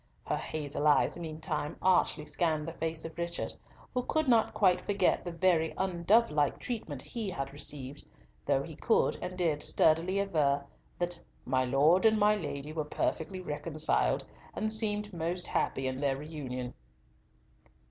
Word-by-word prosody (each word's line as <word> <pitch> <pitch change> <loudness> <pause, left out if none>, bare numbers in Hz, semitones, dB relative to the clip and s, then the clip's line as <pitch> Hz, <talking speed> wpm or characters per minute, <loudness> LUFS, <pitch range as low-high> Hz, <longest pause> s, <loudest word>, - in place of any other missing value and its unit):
Her - - 0
hazel 150 -1 -2
eyes 150 - +4
meantime 155 -1 -4
archly 175 -4 +2
scanned 155 0 0
the 165 - -4
face 160 -1 -3
of 165 - -7
Richard, 170 0 -2 0.4
who 250 - +1
could 315 +4 0
not 230 -3 +4
quite 185 -4 +3
forget 200 -3 +1
the 175 - -4
very 165 -2 +2
undovelike 170 - +2
treatment 150 - -5
he 225 -4 -4
had 135 -6 -4
received, 145 -1 -5 0.4
though - - +1
he - - -8
could - - +2
and 180 0 -5
did 160 -5 +1
sturdily 165 +5 +3
aver 150 -8 +1 0.3
that 175 -1 -2 0.2
"my 130 0 +2
Lord 150 - +5
and 220 0 +4
my 210 0 +4
Lady 150 -5 -5
were 155 -1 -1
perfectly 165 +4 -2
reconciled, 155 -1 0 0.3
and 215 0 -1
seemed 210 -2 -1
most 175 +2 -2
happy 135 - -1
in 130 +1 -2
their 140 -2 +1
reunion." 135 -5 -5
165 Hz, 150 wpm, -31 LUFS, 145-185 Hz, 0.4 s, Lord